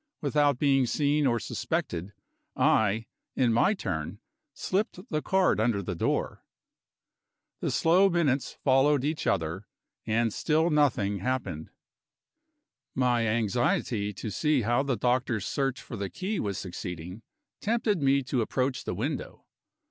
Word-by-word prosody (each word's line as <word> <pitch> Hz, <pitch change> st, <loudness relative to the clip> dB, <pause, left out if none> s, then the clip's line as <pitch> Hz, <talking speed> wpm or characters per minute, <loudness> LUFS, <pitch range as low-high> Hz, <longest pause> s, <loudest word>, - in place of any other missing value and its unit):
Without 145 Hz, -2 st, +2 dB
being 135 Hz, -2 st, +3 dB
seen 145 Hz, +2 st, +2 dB
or 120 Hz, -2 st, +1 dB
suspected, 90 Hz, -3 st, -3 dB, 0.4 s
I, 110 Hz, +1 st, +2 dB, 0.3 s
in 120 Hz, -3 st, +2 dB
my 195 Hz, -, +3 dB
turn, 80 Hz, -, -4 dB, 0.3 s
slipped 195 Hz, -1 st, -2 dB
the 155 Hz, -1 st, 0 dB
card 190 Hz, -, +2 dB
under 110 Hz, -3 st, +1 dB
the 90 Hz, -, -3 dB
door. 85 Hz, -, -2 dB, 1.2 s
The -, -, -1 dB
slow 180 Hz, +4 st, +4 dB
minutes 150 Hz, -7 st, +1 dB
followed 135 Hz, +1 st, +4 dB
each 150 Hz, +2 st, -2 dB
other 90 Hz, +2 st, -1 dB, 0.4 s
and 115 Hz, 0 st, +1 dB
still 160 Hz, +2 st, +1 dB
nothing 115 Hz, -10 st, +2 dB
happened. 115 Hz, -8 st, -3 dB, 1.3 s
My 120 Hz, -3 st, +2 dB
anxiety 110 Hz, -1 st, 0 dB
to 105 Hz, +2 st, -6 dB
see 150 Hz, +1 st, +1 dB
how 120 Hz, +4 st, +2 dB
the 135 Hz, -3 st, -1 dB
doctor's 120 Hz, -4 st, 0 dB
search 135 Hz, -2 st, -1 dB
for 120 Hz, -, -8 dB
the 100 Hz, -2 st, -4 dB
key 190 Hz, -, -3 dB
was 100 Hz, -2 st, -2 dB
succeeding, 90 Hz, +1 st, -6 dB, 0.4 s
tempted 215 Hz, -5 st, 0 dB
me 140 Hz, 0 st, +3 dB
to 125 Hz, -1 st, -1 dB
approach 130 Hz, +3 st, -1 dB
the -, -, -3 dB
window. -, -, -4 dB
125 Hz, 135 wpm, -28 LUFS, 105-145 Hz, 1.3 s, slow